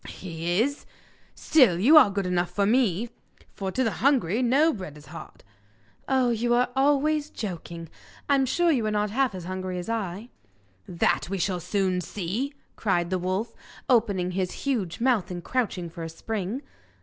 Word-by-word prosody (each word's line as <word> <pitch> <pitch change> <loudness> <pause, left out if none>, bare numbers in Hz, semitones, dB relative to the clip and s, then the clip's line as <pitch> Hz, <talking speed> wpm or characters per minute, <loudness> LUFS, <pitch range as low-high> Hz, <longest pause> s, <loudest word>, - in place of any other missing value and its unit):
'He 175 0 -3
is. 285 +2 -4 0.5
Still, 255 - +4
you 250 - +5
are 295 -9 +9
good 200 -1 -2
enough 180 -1 0
for 200 +3 0
me; 230 -1 +2 0.4
for 190 -1 -4
"to 260 - 0
the 225 - +1
hungry 245 - +2
no 280 +6 +3
bread 180 - -8
is 150 - -14
hard."' 165 - -11 0.6
'Oh, 260 -2 +2
you 240 +1 +1
are 245 +1 +2
always 290 +2 +2
joking! 170 - -6 0.4
I'm 275 -2 +3
sure 345 +5 +2
you 255 -7 +1
are - - +1
not 210 -1 0
half 255 -2 +1
as 180 - -6
hungry 185 0 -4
as 180 +4 -5
I!' 215 0 -3 0.6
'That 170 0 0
we 195 - -2
shall 180 0 -1
soon 185 +1 0
see,' 210 - -4 0.2
cried 175 -4 0
the 185 - 0
wolf, 190 +6 -2 0.3
opening 200 -7 +2
his 185 0 -1
huge 220 -11 -1
mouth 235 -7 +1
and 175 -1 -6
crouching 210 -8 -2
for 165 0 -9
a 165 - -4
spring. 215 - -4
205 Hz, 175 wpm, -26 LUFS, 180-255 Hz, 0.6 s, are